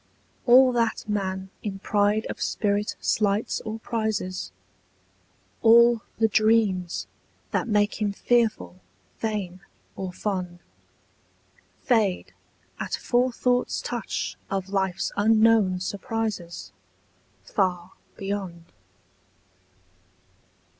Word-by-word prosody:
All 255 +1 +7
that 230 -2 0
man 190 -2 -2
in 200 -2 -4
pride 205 +2 +1
of - - -7
spirit 205 -1 0
slights 210 0 0
or 220 +1 -5
prizes, 220 -5 -3 1.1
All 235 0 +6 0.2
the 225 - +3
dreams 215 -5 +2 0.5
that - - 0
make 210 0 +1
him 205 -1 +1
fearful, 205 - 0 0.4
fain, 205 -5 -3 0.4
or 190 -1 -4
fond, 180 -2 -3 1.3
Fade 215 -7 +1 0.5
at - - -2
forethought's 245 0 +1
touch 240 -4 -4
of 195 -1 -3
life's 190 -2 -1
unknown 215 -3 +4
surprises 200 -3 -4 0.7
Far 185 -2 -1 0.3
beyond. 195 -4 -4
205 Hz, 85 wpm, -25 LUFS, 190-225 Hz, 1.3 s, All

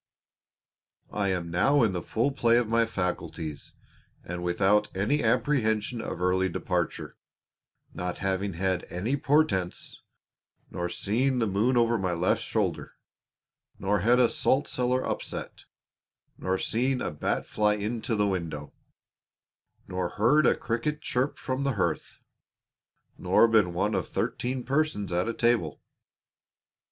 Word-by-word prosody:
I 100 -1 -1
am 90 -3 -2
now 135 +11 +3
in 105 -4 +2
the 90 - -2
full 115 +10 0
play 120 -3 +3
of 120 -2 +1
my 115 +1 +2
faculties, 85 -6 -4 0.5
and 90 0 -5
without 95 +4 +2
any 120 +10 +1
apprehension 115 -2 +1
of - - -5
early 95 +1 +2
departure, - - -3 0.8
not 90 0 -4
having 95 0 -1
had 95 +1 -1
any 105 +10 -1
portents, 135 - 0 0.7
nor 90 0 -3
seen 125 +9 0
the 115 - +2
moon 110 +5 +1
over 115 -1 +3
my 90 -2 -1
left 85 +2 +1
shoulder, - - -2 0.8
nor 100 +1 0
had 120 +7 +4
a 125 - +6
salt 140 +5 +1
cellar 125 +1 0
upset, - - -5 0.7
nor 95 0 -1
seen 125 +6 0
a - - -2
bat 75 - -2
fly 105 -1 +1
into 110 +2 -2
the 105 -1 +2
window, 85 -7 -3 1.1
nor 90 -1 -2
heard 130 +9 +3
a - - +4
cricket 150 +7 -2
chirp 130 +1 -1
from 130 +1 -3
the 140 -1 +1
hearth, 85 -6 -2 1.0
nor 115 - +4
been 110 -6 +3
one - - 0
of - - -1
thirteen 125 +1 -2
persons 135 - -1
at 90 +4 +1
a - - -1
table. 115 -11 +1
105 Hz, 135 wpm, -27 LUFS, 90-125 Hz, 1.1 s, a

